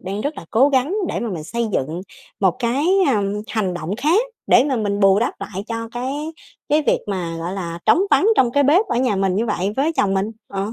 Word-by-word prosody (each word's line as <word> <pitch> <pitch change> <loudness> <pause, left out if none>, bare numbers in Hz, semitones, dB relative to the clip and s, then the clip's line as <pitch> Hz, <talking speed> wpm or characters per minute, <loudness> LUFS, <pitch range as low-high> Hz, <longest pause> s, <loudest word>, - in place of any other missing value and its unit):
đang 195 +3 -4
rất 290 +5 -3
là - - -8
cố 255 +6 +4
gắng 280 +6 +1
để - - -2
mà 235 - -3
mình 160 -5 -5
xây 235 +5 -2
dựng 155 +6 -2 0.4
một 190 -3 +2
cái, 255 +6 0 0.2
à, 215 -7 +2 0.3
hành 195 -6 -1
động 175 +5 -4
khác 315 - +3 0.3
để - - +5
mà 275 -3 0
mình 205 -2 -1
bù 195 0 +5
đắp 235 - 0
lại 195 +1 -6
cho 230 -1 -4
cái 280 +6 -4 0.4
cái 300 +1 +3
việc - - +3
mà, 180 -5 -3
gọi 170 +2 -4
là, 170 -3 -5
trống 335 - +5
vắng 400 - +4
trong 245 -2 +4
cái 285 +1 +3
bếp 345 +10 +4
ở - - -1
nhà 250 -5 +1
mình 190 -1 +1
như 225 +4 0
vậy 200 -1 -1
với 295 +5 +1
chồng 195 -1 +2
mình, 195 +3 0 0.2
ờ. 200 +2 -3
220 Hz, 240 wpm, -20 LUFS, 195-270 Hz, 0.4 s, để